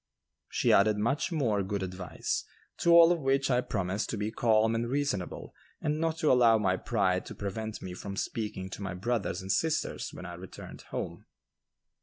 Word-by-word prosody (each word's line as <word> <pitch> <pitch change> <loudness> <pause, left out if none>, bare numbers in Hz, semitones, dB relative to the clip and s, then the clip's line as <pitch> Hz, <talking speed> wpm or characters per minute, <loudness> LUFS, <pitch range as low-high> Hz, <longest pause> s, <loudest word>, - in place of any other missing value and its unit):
She - - +2
added 105 +1 +5
much 125 - 0
more 120 -11 +1
good 100 0 -2
advice, 90 -1 -3 0.3
to - - +1
all 170 0 +9
of 175 - +1
which 135 -1 +1
I 125 0 +3
promised 100 -2 -2
to 115 - -2
be 105 +1 -2
calm 110 -1 +3
and 115 +1 -1
reasonable 135 -9 -2 0.3
and 150 +1 -1
not 165 0 0
to 155 - +3
allow 120 -3 +6
my 95 -4 +2
pride 95 -3 0
to - - -8
prevent 110 +2 -5
me 90 - -5
from 100 +2 -6
speaking 100 -5 -3
to - - -7
my 100 -2 -4
brothers 95 -2 -2
and 95 - -2
sisters 160 +8 0
when 90 - -9
I 90 - -6
returned 90 +2 -10
home. - - -5
110 Hz, 185 wpm, -30 LUFS, 95-130 Hz, 0.3 s, all